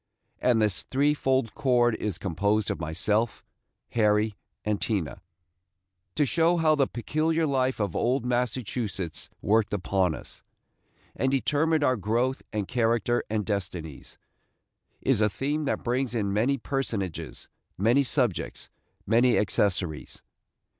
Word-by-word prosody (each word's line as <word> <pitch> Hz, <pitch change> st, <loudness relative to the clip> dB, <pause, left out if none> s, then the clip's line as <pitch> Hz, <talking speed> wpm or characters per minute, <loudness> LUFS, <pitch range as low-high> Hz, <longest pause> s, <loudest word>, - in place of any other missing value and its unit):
And 120 Hz, -3 st, +3 dB
this 105 Hz, -5 st, +2 dB
threefold 135 Hz, -3 st, +1 dB
cord 120 Hz, -3 st, +3 dB
is 105 Hz, -5 st, -2 dB
composed 100 Hz, +3 st, 0 dB
of -, -, -4 dB
myself, 105 Hz, +8 st, 0 dB, 0.5 s
Harry, 105 Hz, -1 st, +2 dB, 0.3 s
and 105 Hz, -1 st, -1 dB
Tina. 100 Hz, -4 st, -2 dB, 0.9 s
To 145 Hz, -, +3 dB
show 165 Hz, +8 st, +2 dB
how 160 Hz, -2 st, +4 dB
the 140 Hz, -3 st, +2 dB
peculiar 160 Hz, +6 st, 0 dB
life 130 Hz, -3 st, 0 dB
of 100 Hz, -5 st, -1 dB
old 125 Hz, +1 st, +1 dB
Massachusetts 120 Hz, -7 st, -2 dB
worked 105 Hz, +1 st, +2 dB
upon 95 Hz, -3 st, 0 dB
us, -, -, -11 dB, 0.7 s
and 130 Hz, -, +1 dB
determined 150 Hz, +3 st, +2 dB
our 130 Hz, -2 st, +3 dB
growth 115 Hz, +6 st, 0 dB
and 105 Hz, -3 st, -2 dB
character 120 Hz, 0 st, +1 dB
and 105 Hz, -1 st, -1 dB
destinies, 90 Hz, -8 st, -4 dB, 0.8 s
is -, -, +2 dB
a 105 Hz, -, +4 dB
theme 145 Hz, +8 st, -2 dB
that -, -, -1 dB
brings 125 Hz, 0 st, -1 dB
in 100 Hz, -3 st, 0 dB
many 120 Hz, +7 st, +2 dB
personages, 115 Hz, -, -3 dB, 0.3 s
many 115 Hz, +8 st, +4 dB
subjects, 125 Hz, -, -1 dB, 0.3 s
many 120 Hz, +3 st, +4 dB
accessories. 90 Hz, -5 st, 0 dB
115 Hz, 125 wpm, -27 LUFS, 100-130 Hz, 0.9 s, how